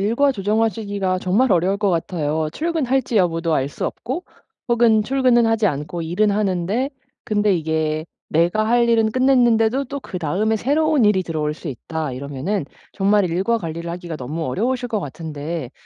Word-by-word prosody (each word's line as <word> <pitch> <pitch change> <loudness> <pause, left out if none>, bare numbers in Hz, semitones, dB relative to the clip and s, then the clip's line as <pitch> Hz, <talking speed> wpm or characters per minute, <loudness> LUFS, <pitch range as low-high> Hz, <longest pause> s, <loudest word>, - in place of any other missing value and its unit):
일과 235 +8 +2
조정하시기가 205 -3 0
정말 205 +8 +2
어려울 185 +3 +2
것 205 -2 +1
같아요. 160 -2 -1
출근할지 270 - 0
여부도 165 -3 +1
알 135 -1 0
수 - - -4
없고 265 +10 -5 0.4
혹은 230 -2 +4
출근은 250 -1 +3
하지 225 -1 +2
않고 150 +1 -3
일은 180 +6 +1
하는데 205 +5 0 0.3
근데 210 -2 +2
이게 155 -1 -1 0.2
내가 175 +7 +2
할 235 +1 +3
일은 225 -2 +3
끝냈는데도 250 0 +3
또 280 +2 -5
그다음에 190 - -1
"새로운 295 +2 +2
일이 190 -3 +3
들어올 155 -3 -2
수 165 0 -8
있다." 150 +2 -4
이러면은 140 +8 -3 0.3
정말 200 0 +2
일과 195 +7 +1
관리를 170 -2 -5
하기가 175 -2 -6
너무 150 +5 -4
어려우실 245 - -1
것 220 -3 -1
같은데 150 -2 -5
200 Hz, 365 characters per minute, -21 LUFS, 165-230 Hz, 0.4 s, 혹은